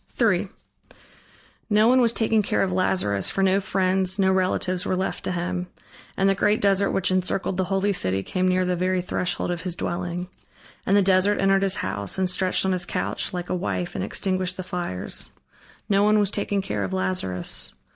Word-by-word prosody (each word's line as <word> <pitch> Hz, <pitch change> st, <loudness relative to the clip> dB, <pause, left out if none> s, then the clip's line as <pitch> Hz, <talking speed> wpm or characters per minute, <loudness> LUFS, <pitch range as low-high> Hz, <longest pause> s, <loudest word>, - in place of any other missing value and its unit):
III -, -, +2 dB, 1.2 s
No 215 Hz, +1 st, +4 dB
one 255 Hz, +1 st, +5 dB
was 235 Hz, -2 st, +3 dB
taking 225 Hz, -1 st, +2 dB
care 200 Hz, -, 0 dB
of 190 Hz, -, -1 dB
Lazarus, 140 Hz, -, +1 dB
for 195 Hz, -, -1 dB
no 195 Hz, +1 st, +3 dB
friends 190 Hz, 0 st, +1 dB
no 190 Hz, -1 st, +3 dB
relatives 185 Hz, -1 st, 0 dB
were 185 Hz, -, -1 dB
left 190 Hz, +1 st, -3 dB
to -, -, -2 dB
him, 180 Hz, 0 st, -3 dB, 0.5 s
and 195 Hz, -, +3 dB
the 195 Hz, -, +4 dB
great 205 Hz, +2 st, +2 dB
desert 200 Hz, 0 st, +2 dB
which 190 Hz, -1 st, 0 dB
encircled 185 Hz, +1 st, 0 dB
the 185 Hz, 0 st, 0 dB
holy 195 Hz, +2 st, 0 dB
city, 95 Hz, -, +1 dB
came 185 Hz, -, -1 dB
near 185 Hz, 0 st, +2 dB
the 180 Hz, 0 st, 0 dB
very 185 Hz, +1 st, 0 dB
threshold 180 Hz, 0 st, -1 dB
of 175 Hz, -2 st, -3 dB
his 180 Hz, -1 st, -3 dB
dwelling. 175 Hz, 0 st, -3 dB, 0.6 s
And 195 Hz, -, +4 dB
the 200 Hz, -, +4 dB
desert 190 Hz, +2 st, +3 dB
entered 195 Hz, 0 st, +3 dB
his 195 Hz, -1 st, +1 dB
house, 100 Hz, -1 st, -3 dB
and 190 Hz, -1 st, +1 dB
stretched 185 Hz, +1 st, +1 dB
on 190 Hz, -, +1 dB
his 180 Hz, -1 st, 0 dB
couch, -, -, -2 dB
like 180 Hz, -1 st, -5 dB
a -, -, +1 dB
wife 180 Hz, -1 st, -3 dB
and -, -, -3 dB
extinguished 185 Hz, -1 st, -2 dB
the 185 Hz, -, -4 dB
fires. 175 Hz, -, -3 dB, 0.6 s
No 200 Hz, -2 st, +3 dB
one 210 Hz, +1 st, +4 dB
was 205 Hz, -1 st, +1 dB
taking 200 Hz, -1 st, -1 dB
care 105 Hz, -, -2 dB
of 95 Hz, -1 st, -4 dB
Lazarus. 95 Hz, -1 st, -2 dB
185 Hz, 195 wpm, -24 LUFS, 180-195 Hz, 1.2 s, one